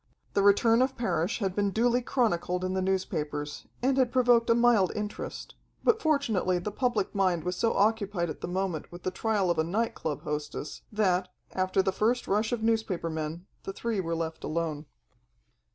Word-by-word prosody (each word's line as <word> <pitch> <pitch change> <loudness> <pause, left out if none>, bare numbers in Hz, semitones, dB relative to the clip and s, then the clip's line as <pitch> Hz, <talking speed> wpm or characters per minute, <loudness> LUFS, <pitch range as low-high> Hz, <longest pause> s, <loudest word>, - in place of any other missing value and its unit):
The 200 - +3
return 225 +4 +5
of 260 +1 0
Parrish 180 -5 0
had 195 -4 -2
been 205 -1 +1
duly 240 +4 +2
chronicled 180 -8 0
in 185 - -1
the 190 - 0
newspapers, 155 -6 -2 0.2
and 265 +1 +2
had 250 -2 +3
provoked 245 -2 +4
a 230 - +6
mild 235 -5 +4
interest, 210 0 -5 0.3
but 445 -1 +3
fortunately 230 - +1
the 180 +4 -3
public 235 -3 0
mind 185 -5 +1
was 180 0 -2
so 230 +5 +1
occupied 200 -4 +1
at 155 - -7
the - - -3
moment 180 -3 -2
with 175 0 -10
the 185 - -1
trial 205 -2 +1
of 170 - -1
a - - +4
night 215 +8 -1
club 150 -3 -4
hostess 150 0 -4
that, 190 -4 +1 0.2
after 185 +1 +1
the 190 - +1
first 230 +5 +1
rush 215 +3 +1
of 235 -2 -2
newspaper 220 -7 0
men, 160 +2 -4 0.2
the 195 - -6
three 225 0 -2
were 165 -2 -1
left 160 -1 -4
alone. 155 -2 -2
195 Hz, 185 wpm, -28 LUFS, 175-230 Hz, 0.3 s, a